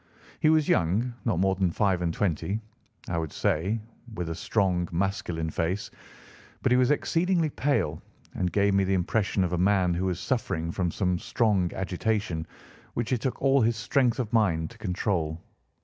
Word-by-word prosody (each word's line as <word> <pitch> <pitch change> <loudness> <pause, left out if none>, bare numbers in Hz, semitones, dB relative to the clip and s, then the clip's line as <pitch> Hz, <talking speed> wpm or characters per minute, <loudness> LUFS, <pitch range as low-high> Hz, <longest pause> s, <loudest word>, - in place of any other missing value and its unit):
He 155 - +4
was 155 -2 +4
young, 100 +9 +2
not 110 -8 +1
more 95 +2 +3
than 95 -1 +1
five 95 0 +1
and 85 -1 0
twenty, 95 +3 -1 0.5
I - - -4
should 80 -3 -4
say, 95 +9 0 0.4
with 90 -4 -3
a - - -1
strong, 90 0 0
masculine 85 -3 -1
face; 90 +6 -2 0.7
but - - +2
he - - +6
was 125 0 +4
exceedingly 165 +2 +1
pale 80 - 0 0.3
and 90 -1 -1
gave 100 -1 +2
me 100 0 +3
the 95 0 +1
impression 95 +2 +1
of 90 -1 -1
a 90 - 0
man 95 -1 +3
who 90 +2 -1
was 90 -2 -1
suffering 85 -6 -1
from 90 0 -1
some 90 0 0
strong 100 -7 +1
agitation, 95 -3 -1 0.5
which 120 +2 -1
it 120 - 0
took 130 - -2
all 135 0 +4
his 115 0 +2
strength 120 +1 +1
of 120 -4 -3
mind 85 -8 +2
to - - -16
control. 90 -4 -1
95 Hz, 180 wpm, -27 LUFS, 85-115 Hz, 0.7 s, he